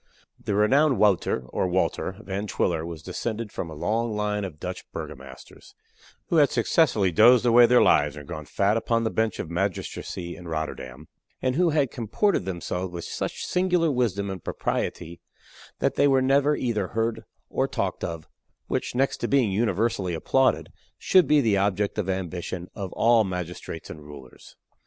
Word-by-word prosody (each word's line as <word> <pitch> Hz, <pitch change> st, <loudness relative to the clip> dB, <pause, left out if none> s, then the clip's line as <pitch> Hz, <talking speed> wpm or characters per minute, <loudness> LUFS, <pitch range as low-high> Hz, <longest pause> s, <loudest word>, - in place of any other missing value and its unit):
The 100 Hz, -, -1 dB
renowned 135 Hz, +7 st, +4 dB
Wouter 95 Hz, -10 st, +2 dB
(or -, -, -1 dB
Walter) 95 Hz, +1 st, -1 dB
Van 100 Hz, +2 st, -4 dB
Twiller 85 Hz, -5 st, 0 dB
was 80 Hz, -1 st, -7 dB
descended 110 Hz, +3 st, -4 dB
from 85 Hz, -, -5 dB
a 80 Hz, -, -8 dB
long 110 Hz, +8 st, -1 dB
line 105 Hz, 0 st, -1 dB
of 85 Hz, -6 st, -7 dB
Dutch -, -, -5 dB
burgomasters, 65 Hz, -1 st, -10 dB, 0.5 s
who 170 Hz, -, +2 dB
had 145 Hz, -2 st, +6 dB
successively 115 Hz, -, +2 dB
dozed 120 Hz, +7 st, +6 dB
away 120 Hz, 0 st, +7 dB
their 125 Hz, +1 st, +5 dB
lives 75 Hz, 0 st, +3 dB
and 75 Hz, -1 st, -10 dB
grown 75 Hz, -1 st, -6 dB
fat 100 Hz, +7 st, +1 dB
upon 115 Hz, 0 st, 0 dB
the 110 Hz, -, -1 dB
bench 110 Hz, -2 st, 0 dB
of 80 Hz, -, -5 dB
magistracy 90 Hz, -1 st, -3 dB
in 90 Hz, -2 st, -11 dB
Rotterdam, 75 Hz, -3 st, -5 dB, 0.3 s
and 130 Hz, -1 st, 0 dB
who 175 Hz, +4 st, +3 dB
had 145 Hz, -5 st, +1 dB
comported 120 Hz, -, 0 dB
themselves 90 Hz, 0 st, -4 dB
with 85 Hz, -1 st, -6 dB
such -, -, -4 dB
singular 180 Hz, -3 st, +1 dB
wisdom 100 Hz, -6 st, -1 dB
and 95 Hz, -3 st, -7 dB
propriety 85 Hz, +1 st, -3 dB, 0.6 s
that -, -, 0 dB
they 145 Hz, -, +3 dB
were 135 Hz, -1 st, +4 dB
never 140 Hz, +3 st, +3 dB
either 110 Hz, -8 st, -1 dB
heard 115 Hz, +2 st, -2 dB, 0.2 s
or -, -, 0 dB
talked -, -, -3 dB
of 80 Hz, -2 st, -5 dB, 0.4 s
which, -, -, -3 dB
next 135 Hz, +2 st, +1 dB
to -, -, -2 dB
being 130 Hz, -7 st, +2 dB
universally 105 Hz, -2 st, 0 dB
applauded, 130 Hz, +10 st, +1 dB, 0.3 s
should 185 Hz, -2 st, +4 dB
be 150 Hz, -1 st, +5 dB
the 110 Hz, -5 st, +2 dB
object 100 Hz, +1 st, 0 dB
of 95 Hz, -2 st, -2 dB
ambition 90 Hz, -1 st, -4 dB
of 95 Hz, -3 st, -6 dB
all 115 Hz, -1 st, +4 dB
magistrates 90 Hz, -3 st, -6 dB
and 75 Hz, -, -9 dB
rulers. 75 Hz, -3 st, -13 dB
100 Hz, 170 wpm, -25 LUFS, 85-120 Hz, 0.6 s, away